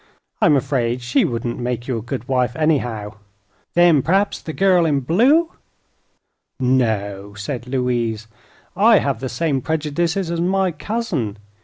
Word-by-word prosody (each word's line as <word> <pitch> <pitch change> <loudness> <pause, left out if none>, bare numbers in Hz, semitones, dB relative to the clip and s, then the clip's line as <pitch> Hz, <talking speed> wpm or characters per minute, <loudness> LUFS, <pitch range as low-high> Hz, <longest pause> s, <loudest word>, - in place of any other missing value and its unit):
I'm 150 - +5
afraid 125 -3 -1
she 120 +1 +2
wouldn't 120 0 -3
make 120 -1 -3
you 130 - -1
a 115 - -3
good 120 +1 -6
wife, 125 -1 0
anyhow." 120 -10 -1 0.6
"Then 170 -4 +5
p'raps 195 +7 +1
the 160 - -6
gal 180 -1 +3
in 140 -3 +1
blue 265 - +3 0.6
" - - -51
"No;" 105 -6 0
said 120 +4 -5
Louise. 120 -4 -1 0.5
"I 215 +3 +6
have 140 -9 -1
the 130 +1 -4
same 135 +2 -1
prejudices 160 +4 -1
as 170 0 -1
my 190 +1 +1
cousin. 155 - -3
135 Hz, 145 wpm, -20 LUFS, 120-170 Hz, 0.6 s, I